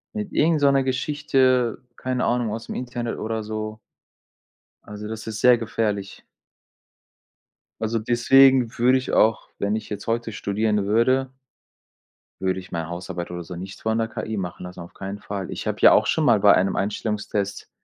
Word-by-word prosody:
Mit 210 Hz, -1 st, -4 dB
irgend 155 Hz, -1 st, +2 dB
so 140 Hz, -1 st, +5 dB
'ner 135 Hz, -1 st, +3 dB
Geschichte 130 Hz, -3 st, +1 dB, 0.2 s
keine 130 Hz, -1 st, -2 dB
Ahnung, 120 Hz, -2 st, +1 dB
aus'm 115 Hz, -, -6 dB
Internet 120 Hz, -2 st, -4 dB
oder 110 Hz, 0 st, -3 dB
so. 110 Hz, 0 st, -5 dB, 1.0 s
Also 105 Hz, 0 st, -8 dB
das 110 Hz, 0 st, -7 dB
ist 110 Hz, -1 st, -4 dB
sehr 125 Hz, -1 st, +6 dB
gefährlich. 105 Hz, -3 st, -3 dB, 1.6 s
Also 110 Hz, +1 st, 0 dB
deswegen 125 Hz, +1 st, +4 dB
würde 125 Hz, +2 st, +4 dB
ich 130 Hz, -, -4 dB
auch 110 Hz, 0 st, +2 dB
wenn 100 Hz, +1 st, 0 dB
ich 110 Hz, -, -5 dB
jetzt 105 Hz, +1 st, -6 dB
heute 115 Hz, 0 st, -1 dB
studieren 105 Hz, +1 st, -1 dB
würde 130 Hz, +5 st, +2 dB, 1.1 s
würde 95 Hz, 0 st, 0 dB
ich 90 Hz, -, -13 dB
meine 80 Hz, -2 st, -3 dB
Hausarbeit 85 Hz, 0 st, -5 dB
oder 90 Hz, 0 st, -5 dB
so 90 Hz, +1 st, -8 dB
nicht 95 Hz, +3 st, -8 dB
von 110 Hz, 0 st, 0 dB
der 115 Hz, 0 st, 0 dB
KI 110 Hz, 0 st, -4 dB
machen 90 Hz, -1 st, -5 dB
lassen, 90 Hz, 0 st, -8 dB
auf 85 Hz, -, -11 dB
keinen 100 Hz, +1 st, -6 dB
Fall. 100 Hz, -2 st, -5 dB
Ich -, -, -5 dB
habe -, -, -2 dB
ja -, -, +8 dB
auch -, -, +4 dB
schon -, -, +1 dB
mal -, -, +5 dB
bei 100 Hz, -1 st, +7 dB
einem 95 Hz, +1 st, +2 dB
Einstellungstest, 105 Hz, 0 st, -2 dB
110 Hz, 170 wpm, -23 LUFS, 100-125 Hz, 1.6 s, ja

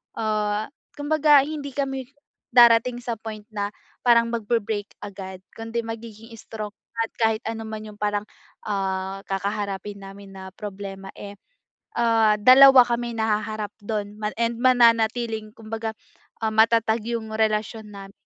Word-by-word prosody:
ah, 215 Hz, +1 st, -1 dB, 0.2 s
kumbaga 295 Hz, -1 st, +4 dB
hindi 285 Hz, -2 st, -6 dB
kami 270 Hz, -2 st, -2 dB, 0.5 s
darating 240 Hz, 0 st, +6 dB
sa 235 Hz, -1 st, -2 dB
point 215 Hz, -1 st, -7 dB
na 205 Hz, -1 st, -2 dB, 0.4 s
parang 235 Hz, -1 st, +5 dB
magbre-break 220 Hz, -2 st, -2 dB
agad. 190 Hz, -2 st, -8 dB, 0.2 s
Kundi 225 Hz, +1 st, -4 dB
magiging 225 Hz, 0 st, -8 dB
strong 215 Hz, -2 st, -7 dB, 0.3 s
at 225 Hz, -, 0 dB
kahit 220 Hz, -1 st, +2 dB
ano 225 Hz, 0 st, -4 dB
man 215 Hz, -1 st, -7 dB
yung 210 Hz, -, -11 dB
parang, 210 Hz, 0 st, -1 dB, 0.4 s
ah, 195 Hz, -1 st, -2 dB
kakaharapin 200 Hz, 0 st, -4 dB
namin 195 Hz, 0 st, -11 dB
na 190 Hz, 0 st, -9 dB
problema, 195 Hz, -2 st, -7 dB
eh, 200 Hz, 0 st, -8 dB, 0.7 s
ah, 225 Hz, -2 st, +3 dB
2 255 Hz, +2 st, +8 dB
kami 235 Hz, 0 st, -2 dB
na 215 Hz, -1 st, +1 dB
haharap 215 Hz, -1 st, -5 dB
dun 205 Hz, -1 st, -3 dB
ma 210 Hz, -, 0 dB
and 235 Hz, 0 st, 0 dB
mananatiling 230 Hz, -3 st, +3 dB
kumbaga, 225 Hz, 0 st, -5 dB, 0.5 s
ah, 220 Hz, -, 0 dB
matatag 225 Hz, 0 st, +3 dB
yung 230 Hz, -1 st, -3 dB
relasyon 215 Hz, 0 st, -1 dB
namin 195 Hz, 0 st, -11 dB
220 Hz, 135 wpm, -24 LUFS, 205-235 Hz, 0.7 s, 2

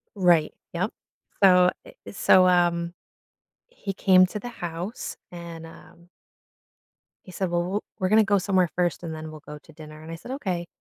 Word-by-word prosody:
Right, 175 Hz, -5 st, +3 dB, 0.2 s
yup, 185 Hz, +5 st, -1 dB, 0.5 s
so 180 Hz, -2 st, +6 dB, 0.2 s
eh, -, -, -12 dB
e -, -, -8 dB
so, 185 Hz, -1 st, +5 dB
um, 175 Hz, -1 st, +2 dB, 0.8 s
he 475 Hz, -, -6 dB
came 185 Hz, -1 st, +5 dB
to 210 Hz, -, -6 dB
the 245 Hz, -, -6 dB
house, 175 Hz, -1 st, -6 dB
and, 170 Hz, -2 st, -9 dB
um 170 Hz, +1 st, -16 dB, 1.2 s
he 185 Hz, -, -12 dB
said, 185 Hz, -1 st, -2 dB
"Well, 175 Hz, 0 st, +1 dB
w 190 Hz, +4 st, -2 dB, 0.2 s
we're 185 Hz, 0 st, 0 dB
gonna 220 Hz, +1 st, +5 dB
go 200 Hz, 0 st, +2 dB
somewhere 185 Hz, -2 st, +1 dB
first 175 Hz, 0 st, 0 dB
and 160 Hz, -1 st, -5 dB
then 155 Hz, 0 st, -7 dB
we'll 155 Hz, -, -11 dB
go 150 Hz, -, -8 dB
to 160 Hz, -, -19 dB
dinner," 155 Hz, 0 st, -12 dB
and 160 Hz, +1 st, -9 dB
I -, -, -5 dB
said, 205 Hz, +10 st, -10 dB
"Okay," 180 Hz, -10 st, -3 dB
175 Hz, 185 wpm, -25 LUFS, 170-190 Hz, 1.2 s, so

